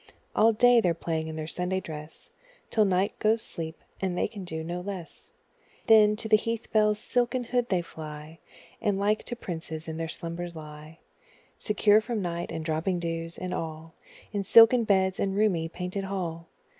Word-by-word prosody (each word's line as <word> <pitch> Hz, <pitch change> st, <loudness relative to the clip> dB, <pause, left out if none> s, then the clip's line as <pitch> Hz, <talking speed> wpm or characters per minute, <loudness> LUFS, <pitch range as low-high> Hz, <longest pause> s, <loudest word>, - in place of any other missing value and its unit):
All 225 Hz, +1 st, +5 dB
day 240 Hz, +2 st, +5 dB
they're 175 Hz, -5 st, +1 dB
playing 160 Hz, -1 st, -2 dB
in 160 Hz, -, -5 dB
their 155 Hz, -1 st, -4 dB
Sunday 180 Hz, +3 st, -2 dB
dress 155 Hz, -3 st, -9 dB, 0.4 s
Till 215 Hz, -2 st, +4 dB
night 190 Hz, +1 st, 0 dB
goes 220 Hz, +1 st, +2 dB
sleep, 160 Hz, -1 st, -5 dB, 0.2 s
and 185 Hz, -2 st, -1 dB
they -, -, +1 dB
can 205 Hz, -3 st, -8 dB
do 160 Hz, -2 st, -5 dB
no 175 Hz, +2 st, -4 dB
less; 185 Hz, -3 st, -8 dB, 0.6 s
Then, 210 Hz, -1 st, +6 dB
to 220 Hz, -, -5 dB
the 215 Hz, -1 st, +6 dB
heath 230 Hz, +1 st, -4 dB
bell's 210 Hz, -1 st, +3 dB
silken 245 Hz, +3 st, 0 dB
hood 245 Hz, 0 st, -1 dB
they 180 Hz, -3 st, +1 dB
fly, 155 Hz, 0 st, -9 dB, 0.4 s
And 205 Hz, -3 st, +1 dB
like 210 Hz, +2 st, +1 dB
to 240 Hz, -, -4 dB
princes 160 Hz, -5 st, -6 dB
in 160 Hz, 0 st, -5 dB
their 165 Hz, 0 st, -3 dB
slumbers 170 Hz, +1 st, -5 dB
lie, 155 Hz, 0 st, -10 dB, 0.6 s
Secure 210 Hz, 0 st, +4 dB
from 230 Hz, 0 st, -3 dB
night, 175 Hz, -2 st, -3 dB
and 160 Hz, -1 st, -5 dB
dropping 160 Hz, +4 st, 0 dB
dews, 165 Hz, -1 st, -4 dB
and 180 Hz, 0 st, -4 dB
all, 160 Hz, 0 st, -5 dB, 0.4 s
In 200 Hz, -1 st, -1 dB
silken 230 Hz, +3 st, +7 dB
beds 190 Hz, -2 st, +2 dB
and 195 Hz, -1 st, 0 dB
roomy 185 Hz, -6 st, +1 dB
painted 180 Hz, +3 st, -4 dB
hall. 170 Hz, -4 st, -4 dB
180 Hz, 180 wpm, -27 LUFS, 165-210 Hz, 0.6 s, silken